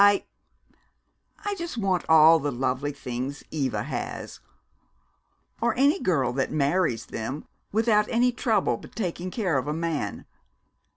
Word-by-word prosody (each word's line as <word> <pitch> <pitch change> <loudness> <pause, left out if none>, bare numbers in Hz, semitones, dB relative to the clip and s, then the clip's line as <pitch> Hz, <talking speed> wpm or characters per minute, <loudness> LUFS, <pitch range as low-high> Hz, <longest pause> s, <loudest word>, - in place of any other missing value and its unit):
I 205 0 +5 1.2
I 410 - 0
just 340 -8 -5
want 190 -5 0
all 160 +1 +8
the 145 0 -1
lovely 130 +3 -1
things 135 0 -5
Eva 140 -5 -1
has, - - -5 1.2
or 235 - +1
any 285 +8 +4
girl 135 - +1
that 135 +1 -1
marries 145 -3 +1
them, 125 +7 -5 0.3
without 215 -1 +3
any 245 +2 +3
trouble 215 - +1
but - - -14
taking 180 -3 -3
care 180 - 0
of 130 - -5
a 150 - 0
man. 160 -10 -3
165 Hz, 135 wpm, -26 LUFS, 135-210 Hz, 1.2 s, all